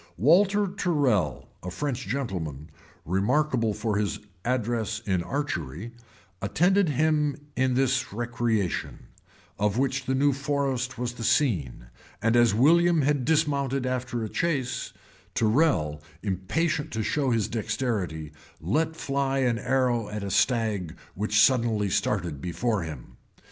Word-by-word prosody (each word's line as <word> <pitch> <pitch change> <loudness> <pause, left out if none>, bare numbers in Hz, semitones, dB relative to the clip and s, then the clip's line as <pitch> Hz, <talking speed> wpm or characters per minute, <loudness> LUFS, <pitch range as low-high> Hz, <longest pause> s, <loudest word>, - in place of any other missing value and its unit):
Walter 195 - +4
Tyrrel, 145 - 0
a 90 - -5
French 130 +5 -3
gentleman, 85 - -4 0.3
remarkable 115 - +1
for 105 0 -1
his 105 -1 -1 0.3
address 115 -3 -1
in 95 -3 +1
archery, 105 - -4 0.5
attended 180 - +2
him 150 0 +1 0.2
in 130 -1 +1
this 130 0 +1
recreation, 115 - -2 0.5
of 105 +1 +1
which 135 0 0
the 130 - +1
new 140 +1 +3
forest 135 -2 -1
was 120 0 -3
the 120 - -7
scene: 90 - +1 0.3
and 115 +2 +2
as 120 -1 +5
William 165 - +4
had 140 -2 +1
dismounted 140 -4 +1
after 125 -2 -2
a - - -2
chase, 145 -6 -1 0.4
Tyrrel, 105 - +2 0.2
impatient 145 - -1
to 110 -1 -1
show 140 +4 0
his 115 -5 +1
dexterity, 105 - -2 0.3
let 155 - 0
fly 135 -2 -1
an 125 -4 +1
arrow 125 -5 +1
at 105 -1 -5
a 100 - -4
stag 105 -5 +1 0.2
which 105 +2 +1
suddenly 110 -4 +3
started 90 -7 -1
before 95 +5 -1
him. 75 -7 -8
120 Hz, 130 wpm, -26 LUFS, 100-140 Hz, 0.5 s, as